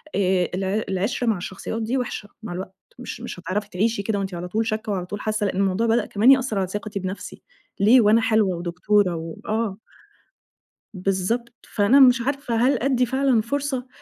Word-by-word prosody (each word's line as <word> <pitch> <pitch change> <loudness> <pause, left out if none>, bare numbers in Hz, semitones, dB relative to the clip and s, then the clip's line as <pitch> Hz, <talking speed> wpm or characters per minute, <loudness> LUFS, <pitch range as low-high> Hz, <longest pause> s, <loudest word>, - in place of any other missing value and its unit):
آآ 185 -2 +2
الع 195 +3 -1
العِشرة 200 +6 -1
مع 220 -3 +2
الشخصيات 190 +5 -5
دي 235 +4 -1
وحشة 225 -4 -4
مع 205 -5 -5
الوقت 185 +1 -7 0.2
مش 245 -1 -7
مش 235 -6 -7
هتعرفي 200 +4 -3
تعيشي 210 +2 0
كده 205 -1 -1
وأنتِ 195 -1 -4
على 175 +1 -5
طول 220 +5 -1
شاكّة 215 -1 -2
وعلى 185 -3 -2
طول 205 +3 -6
حاسّة، 215 -1 -1
لإن 190 - -2
الموضوع 195 +3 +1
بدأ 225 -1 +2
كمان 220 +6 +4
يأثّر 260 -5 +2
على 190 -1 0
ثقتي 205 +1 -5
بنفسي 190 +1 -6 0.4
ليه 225 +6 +6
وأنا 220 +2 +4
حلوة 220 -5 +2
ودكتورة 180 +2 +1
و 165 0 -6
آه. 215 -3 -1 1.2
بالضبط، 195 +5 -1 0.2
فأنا 220 +6 +4
مش 250 -2 +6
عارفة 275 -1 -2
هل 250 +5 +3
أدّي 255 -2 +2
فعلًا 265 -2 +2
فرصة، 265 +1 -3
215 Hz, 185 wpm, -23 LUFS, 190-235 Hz, 1.2 s, ليه